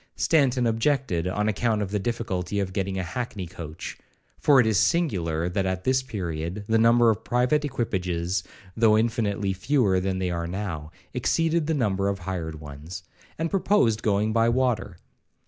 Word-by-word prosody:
Stanton 135 -6 +2
objected, 115 - +1
on 105 +3 0
account 110 +1 +1
of 95 - -5
the 105 - 0
difficulty 100 -3 -2
of 95 -2 -2
getting 95 -1 -2
a 95 - -1
hackney 100 +1 -4
coach, 80 -3 -8 0.4
(for 140 -2 +5
it 125 - +5
is 110 -4 +3
singular 85 - +1
that 95 +2 -1
at 95 0 -2
this 130 0 +2
period 90 -5 -4
the 115 0 +3
number 115 0 +5
of 105 - -4
private 125 +5 +1
equipages, 95 - -1 0.3
though 110 -1 +4
infinitely 110 -4 0
fewer 100 -1 +2
than 95 0 -1
they 90 -1 -1
are 85 -1 -2
now, 85 -5 -4 0.2
exceeded 165 -1 +1
the 160 - +1
number 100 -7 0
of 100 -1 0
hired 85 -4 -5
ones), 75 +4 -9 0.3
and 165 +1 -2
proposed 175 - +2
going 105 +1 +1
by 115 +1 +3
water. 120 -7 0
105 Hz, 165 wpm, -25 LUFS, 90-120 Hz, 0.4 s, for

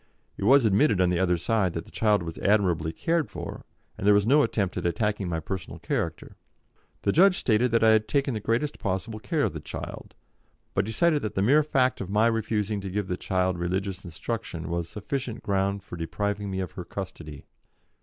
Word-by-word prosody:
It 100 - -4
was 135 +2 +6
admitted 105 0 +3
on 90 -1 +3
the 90 - +1
other 90 -2 +2
side 95 0 +1
that 80 - -4
the - - -17
child 105 -4 +2
was 85 -1 -6
admirably 90 -6 +2
cared 165 - 0
for, - - -7 0.3
and 100 - -1
there 105 - +7
was 100 0 +3
no 145 +6 +5
attempt 100 -9 0
at - - 0
attacking 100 +2 -1
my 85 -1 -1
personal 90 +3 -5
character. - - -3 0.7
The 100 - +3
judge 185 - +5
stated 120 +2 +2
that 115 0 +2
I 110 - +7
had 110 0 +3
taken 140 -2 +1
the 110 - -2
greatest 115 +7 -1
possible 110 +2 -3
care 155 +5 -1
of - - 0
the 80 - -5
child, 75 - -8 0.6
but 95 - +1
decided 150 +8 +2
that 110 - -4
the 95 - +1
mere 140 +8 +5
fact 130 -4 +1
of 95 - -5
my 105 +3 +3
refusing 110 -2 0
to 95 - -5
give 100 0 -3
the 90 - 0
child 90 -1 -1
religious 95 +2 -2
instruction 85 -1 -5
was 85 -1 -2
sufficient 120 +3 -4
ground 100 0 0
for 90 - -8
depriving 100 +4 -2
me 95 0 -2
of 95 - -4
her 90 - -7
custody. 85 -7 -8
100 Hz, 205 wpm, -26 LUFS, 90-115 Hz, 0.7 s, there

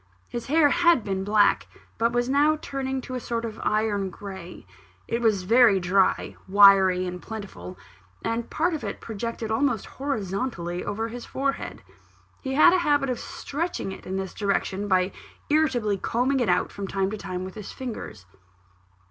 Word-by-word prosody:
His 235 - -6
hair 300 +1 +5
had 340 -6 +4
been 190 -2 -2
black, 205 +1 +3 0.3
but 230 +1 +2
was 240 0 0
now 290 +3 +3
turning 265 -2 -3
to 255 - -8
a 255 - -2
sort 235 -1 -3
of 225 -1 -6
iron 210 -2 0
grey; 190 -2 -9 0.4
it 235 - -1
was 215 -5 +2
very 225 0 +5
dry, 185 +2 +1
wiry, 190 -2 +6
and 180 -1 -5
plentiful, 190 - -8 0.5
and 230 +1 -2
part 340 +3 0
of 310 - -4
it - - -4
projected 225 0 -5
almost 235 -2 +1
horizontally 195 -8 -3
over 220 +3 -3
his 240 +1 -8
forehead. 275 +1 -3 0.6
He 265 -1 -3
had 310 +4 +7
a 370 - +4
habit 290 -5 +2
of 245 - -3
stretching 305 - -4
it 190 - -10
in 190 +1 -2
this 190 -1 -4
direction, 200 -1 -1
by 185 -1 +2 0.4
irritably 250 -10 +2
combing 255 +7 +1
it 240 - +1
out, - - +2
from 200 -1 -5
time 195 0 -1
to 215 - -4
time, 185 -1 -4
with 190 - -8
his 210 -2 -8
fingers. 215 - -7
220 Hz, 170 wpm, -25 LUFS, 195-265 Hz, 0.6 s, had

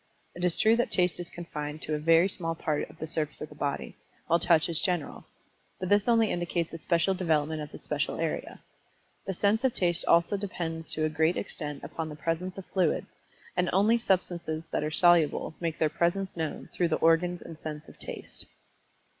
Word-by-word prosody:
It 175 - -7
is 180 -2 +3
true 220 +1 +5
that 240 - +1
Taste 180 -2 +2
is 175 0 -5
confined 155 -3 -6
to 155 - -3
a 150 - 0
very 165 +3 +5
small 165 -4 -3
part 155 -2 -2
of - - -15
the - - -4
surface 155 -1 -2
of 150 - -6
the - - -12
body, 140 -1 -3 0.3
while 170 0 +3
Touch 165 -3 +4
is 165 -2 0
general. 180 -6 -2 0.5
But 185 - -3
this 205 +1 +4
only 230 -2 +4
indicates 175 -1 -2
a 165 - -6
special 170 +4 +2
development 160 -4 0
of 150 - -7
the - - -8
special - - -2
area. - - -3 0.6
The 195 - -2
sense 210 +6 +2
of 260 -3 +2
Taste 175 -2 +2
also 170 +4 +4
depends 165 -5 -4
to 155 - 0
a - - +1
great 160 +3 +2
extent 150 -7 -4
upon 160 +2 -4
the 150 - -7
presence 165 +4 -2
of 195 - -7
fluids, 185 -4 +1 0.4
and 180 0 +1
only 215 +5 +4
substances 175 -6 -1
that - - 0
are 150 - 0
soluble 165 -1 +4
make 165 -2 -2
their 160 - +3
presence 175 +5 0
known 160 -3 -4
through 175 - +2
the 160 - +1
organs 175 +2 +2
and 165 -1 -10
sense 150 -1 -6
of - - -15
Taste. - - -4
170 Hz, 205 wpm, -29 LUFS, 155-180 Hz, 0.6 s, true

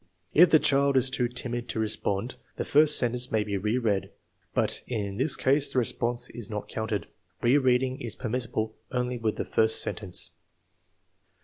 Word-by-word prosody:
If 175 +3 +7
the 155 - +7
child 140 -2 +2
is 130 0 +3
too 125 -2 0
timid 120 0 -4
to 115 - -2
respond, 110 +1 -1 0.2
the - - -3
first 150 +1 +5
sentence 125 +1 +1
may 110 -1 +1
be 105 -1 -4
re 105 +5 0
read, 105 -6 -1 0.4
but - - 0
in 100 -5 -3
this 135 +3 +1
case 140 +2 +2
the - - -3
response 120 0 +1
is 115 -4 -6
not 105 -2 -5
counted. 110 -3 -3 0.4
Re 125 +5 +4
reading 130 0 +1
is 115 -3 -4
permissible 115 -2 -3 0.2
only 125 -1 -2
with 110 -2 -1
the - - -3
first 110 0 +2
sentence. 95 -4 -3
120 Hz, 175 wpm, -27 LUFS, 110-130 Hz, 0.4 s, If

